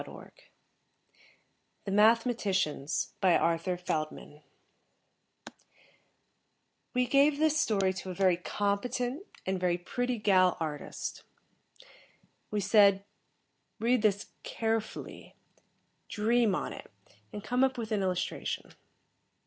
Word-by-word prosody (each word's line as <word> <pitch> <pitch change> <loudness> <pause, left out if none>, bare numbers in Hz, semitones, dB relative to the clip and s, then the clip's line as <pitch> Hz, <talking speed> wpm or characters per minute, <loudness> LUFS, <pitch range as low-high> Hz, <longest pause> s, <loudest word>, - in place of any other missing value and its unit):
net - - -11 1.5
THE 195 - -3
MATHEMATICIANS 200 - +1
BY 185 -3 +5
ARTHUR 170 +2 0
FELDMAN 155 -3 -4 2.5
_We 250 0 +2
gave 285 +2 +4
this 310 0 +2
story 195 -7 +1
to 190 0 -7
a 180 - -5
very 185 -2 +3
competent, 240 - -2 0.2
and 190 0 -1
very 180 -1 +1
pretty 245 +7 -2
gal 185 -4 +3
artist. 155 -3 -5 1.3
We 210 -1 -1
said, 200 -1 +4 0.7
"Read 240 +2 +2
this 205 -2 0
carefully, 225 -1 -4 0.7
dream 225 -1 +2
on - - -3
it, - - -11 0.4
and 205 - -7
come 250 +3 +1
up 265 -1 +1
with 225 -1 -5
an 210 -2 +1
illustration." 185 -2 -3
205 Hz, 100 wpm, -30 LUFS, 185-235 Hz, 2.5 s, BY